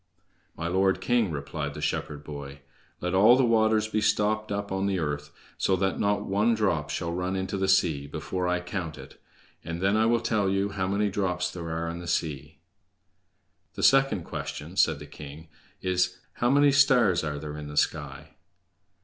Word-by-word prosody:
"My 80 Hz, -, -3 dB
lord 95 Hz, +2 st, +2 dB
king," 120 Hz, -5 st, +1 dB
replied 75 Hz, -1 st, -4 dB
the -, -, -6 dB
shepherd 75 Hz, 0 st, -3 dB
boy, 70 Hz, -2 st, -8 dB, 0.4 s
"let 90 Hz, +1 st, -2 dB
all 105 Hz, +6 st, +7 dB
the 130 Hz, -, +4 dB
waters 110 Hz, -2 st, +3 dB
be 110 Hz, 0 st, -1 dB
stopped 105 Hz, 0 st, +1 dB
up 100 Hz, 0 st, -3 dB
on 95 Hz, +1 st, 0 dB
the 95 Hz, -1 st, 0 dB
earth, 75 Hz, -3 st, -3 dB, 0.3 s
so 95 Hz, -, +2 dB
that 95 Hz, +1 st, -1 dB
not 105 Hz, 0 st, +1 dB
one 105 Hz, +4 st, +2 dB
drop 90 Hz, -9 st, 0 dB
shall 85 Hz, -1 st, -3 dB
run 90 Hz, +2 st, -2 dB
into 95 Hz, +1 st, -2 dB
the 95 Hz, 0 st, 0 dB
sea 80 Hz, -7 st, +2 dB
before 90 Hz, +4 st, -3 dB
I 90 Hz, 0 st, 0 dB
count 90 Hz, -3 st, -5 dB
it, -, -, -13 dB, 0.4 s
and 85 Hz, +1 st, -5 dB
then 100 Hz, +3 st, +2 dB
I 110 Hz, +1 st, +3 dB
will 120 Hz, 0 st, +3 dB
tell 110 Hz, -4 st, 0 dB
you 95 Hz, +1 st, 0 dB
how 95 Hz, -2 st, -2 dB
many 100 Hz, +1 st, 0 dB
drops 90 Hz, -3 st, -1 dB
there 85 Hz, -2 st, -6 dB
are 80 Hz, +1 st, -2 dB
in 85 Hz, +1 st, -5 dB
the 85 Hz, -, -8 dB
sea!" 75 Hz, -2 st, -2 dB, 1.2 s
"The -, -, -4 dB
second 135 Hz, -9 st, +4 dB
question," 75 Hz, +2 st, -6 dB
said 80 Hz, -5 st, +3 dB
the 75 Hz, -, -9 dB
king, 75 Hz, +2 st, -11 dB, 0.3 s
"is: 90 Hz, 0 st, +1 dB, 0.2 s
How 120 Hz, -, 0 dB
many 145 Hz, +1 st, +5 dB
stars 125 Hz, -, +4 dB
are 75 Hz, -2 st, -3 dB
there 75 Hz, 0 st, -6 dB
in 75 Hz, -1 st, -7 dB
the 75 Hz, 0 st, -8 dB
sky?" -, -, -1 dB
95 Hz, 190 wpm, -27 LUFS, 80-105 Hz, 1.2 s, all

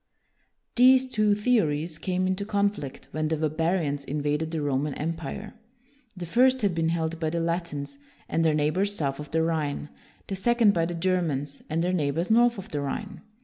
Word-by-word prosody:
These 260 Hz, +1 st, +6 dB
two 215 Hz, -4 st, +2 dB
theories 170 Hz, -8 st, +1 dB
came 185 Hz, +2 st, -1 dB
into 185 Hz, +2 st, -1 dB
conflict 200 Hz, -8 st, -2 dB
when 155 Hz, 0 st, -1 dB
the 160 Hz, 0 st, 0 dB
barbarians 155 Hz, -1 st, 0 dB
invaded 150 Hz, +2 st, -1 dB
the 160 Hz, -1 st, -3 dB
Roman 140 Hz, 0 st, -1 dB
Empire. 165 Hz, +6 st, -4 dB, 0.6 s
The 175 Hz, -, -5 dB
first 255 Hz, +7 st, +3 dB
had 200 Hz, -3 st, +2 dB
been 165 Hz, -1 st, 0 dB
held 165 Hz, 0 st, -1 dB
by 160 Hz, -2 st, 0 dB
the 170 Hz, +1 st, -1 dB
Latins 170 Hz, -, -3 dB, 0.3 s
and 165 Hz, -, 0 dB
their 160 Hz, -2 st, +3 dB
neighbors 180 Hz, +7 st, +1 dB
south 140 Hz, -5 st, -2 dB
of 150 Hz, -1 st, -7 dB
the 160 Hz, 0 st, +1 dB
Rhine; 150 Hz, -3 st, -1 dB, 0.4 s
the 195 Hz, -, -4 dB
second 230 Hz, +1 st, +3 dB
by 165 Hz, -3 st, +1 dB
the 175 Hz, -, -4 dB
Germans 165 Hz, -6 st, -1 dB
and 165 Hz, +2 st, 0 dB
their 180 Hz, +1 st, 0 dB
neighbors 165 Hz, +3 st, 0 dB
north 240 Hz, +1 st, +4 dB
of 195 Hz, -, -8 dB
the 145 Hz, -2 st, -2 dB
Rhine. 195 Hz, +9 st, -5 dB
165 Hz, 180 wpm, -26 LUFS, 150-200 Hz, 0.6 s, These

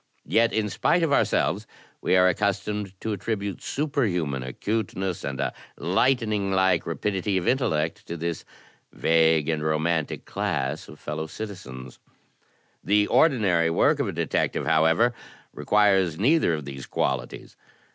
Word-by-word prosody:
Yet 115 Hz, +1 st, +3 dB
in 110 Hz, -1 st, 0 dB
spite 170 Hz, -, +1 dB
of 155 Hz, -3 st, +1 dB
ourselves -, -, +1 dB, 0.3 s
we -, -, +2 dB
are 90 Hz, 0 st, +5 dB
accus -, -, -1 dB
tomed 105 Hz, -3 st, -5 dB
to 110 Hz, -, -2 dB
attribute 100 Hz, -1 st, -3 dB
superhuman 100 Hz, -, -1 dB
acuteness 95 Hz, -, -3 dB
and 70 Hz, -2 st, -4 dB
a -, -, -1 dB, 0.2 s
lightning 105 Hz, 0 st, +1 dB
like 95 Hz, -2 st, +2 dB
rapidity 95 Hz, +3 st, -1 dB
of 90 Hz, -, -2 dB
intellect 80 Hz, -, 0 dB
to 85 Hz, -, -5 dB
this 85 Hz, 0 st, -3 dB, 0.5 s
vague 80 Hz, -2 st, +3 dB
and 80 Hz, -2 st, 0 dB
romantic 80 Hz, 0 st, -1 dB
class 70 Hz, +4 st, -2 dB
of -, -, -12 dB
fellow 75 Hz, +1 st, -4 dB
citizens. 65 Hz, -, -8 dB, 0.8 s
The 105 Hz, 0 st, +3 dB
ordinary 100 Hz, -, +3 dB
work 145 Hz, -, +2 dB
of 140 Hz, -, 0 dB
a -, -, -2 dB
detective, 85 Hz, -2 st, -1 dB
however, 80 Hz, +10 st, +3 dB, 0.4 s
requires 95 Hz, -6 st, +2 dB
neither 125 Hz, -, +3 dB
of 75 Hz, -3 st, -6 dB
these 70 Hz, -1 st, -8 dB
qualities. -, -, -3 dB
95 Hz, 135 wpm, -25 LUFS, 80-105 Hz, 0.8 s, are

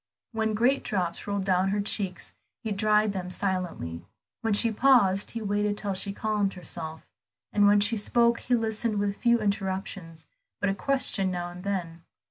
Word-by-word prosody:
When 220 Hz, -2 st, 0 dB
great 250 Hz, +5 st, +2 dB
drops 180 Hz, -3 st, -2 dB
rolled 200 Hz, -1 st, -1 dB
down 185 Hz, 0 st, +2 dB
her 205 Hz, +1 st, 0 dB
cheeks 200 Hz, -2 st, -2 dB, 0.3 s
he 220 Hz, -, -3 dB
dried 210 Hz, 0 st, +2 dB
them 180 Hz, -2 st, -4 dB
silently; 180 Hz, -, -3 dB, 0.4 s
when 225 Hz, -3 st, +1 dB
she 230 Hz, +3 st, +3 dB
paused, 210 Hz, -5 st, +4 dB
he 230 Hz, -1 st, -5 dB
waited 205 Hz, 0 st, 0 dB
till 200 Hz, -2 st, -2 dB
she 195 Hz, +1 st, -1 dB
calmed 205 Hz, -1 st, 0 dB
herself; 160 Hz, -3 st, -6 dB, 0.5 s
and 205 Hz, -1 st, +5 dB
when 205 Hz, 0 st, +6 dB
she 215 Hz, +3 st, +1 dB
spoke 235 Hz, +3 st, +2 dB
he 250 Hz, -, +1 dB
listened 220 Hz, -1 st, 0 dB
with 200 Hz, 0 st, 0 dB
few 235 Hz, -1 st, +3 dB
interruptions 190 Hz, -5 st, -3 dB, 0.3 s
but 205 Hz, -, +1 dB
a -, -, 0 dB
question 205 Hz, -4 st, 0 dB
now 175 Hz, -1 st, -3 dB
and 180 Hz, +1 st, -10 dB
then. 175 Hz, -4 st, -3 dB
200 Hz, 170 wpm, -27 LUFS, 185-215 Hz, 0.5 s, when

